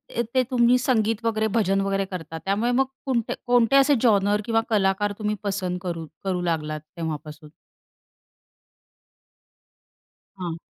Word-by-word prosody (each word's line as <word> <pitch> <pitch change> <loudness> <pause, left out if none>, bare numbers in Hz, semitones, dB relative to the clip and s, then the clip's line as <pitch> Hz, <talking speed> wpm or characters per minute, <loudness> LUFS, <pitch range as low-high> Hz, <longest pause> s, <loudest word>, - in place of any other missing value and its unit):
येथे 235 +2 +1
तुम्ही 245 0 +4
संगीत 230 -3 0
वगैरे 220 -1 +1
भजन 195 -3 +2
वगैरे 195 0 0
करतात. 165 -4 -7
त्यामुळे 215 +5 +1
मग 265 +2 +3 0.2
कुणते 240 -4 0
कोणते 245 +1 +3
असे 275 +1 +6
जॉनर 205 -3 +3
किंवा 225 -1 +2
कलाकार 205 -1 +1
तुम्ही 210 0 -1
पसंत 185 -3 -2
करू 165 -3 -4 0.2
करू 185 -2 -1
लागलात 155 -3 -2 0.2
तेव्हापासून? 155 -1 -6 2.9
हां. 170 -3 -4
205 Hz, 125 wpm, -24 LUFS, 180-235 Hz, 2.9 s, असे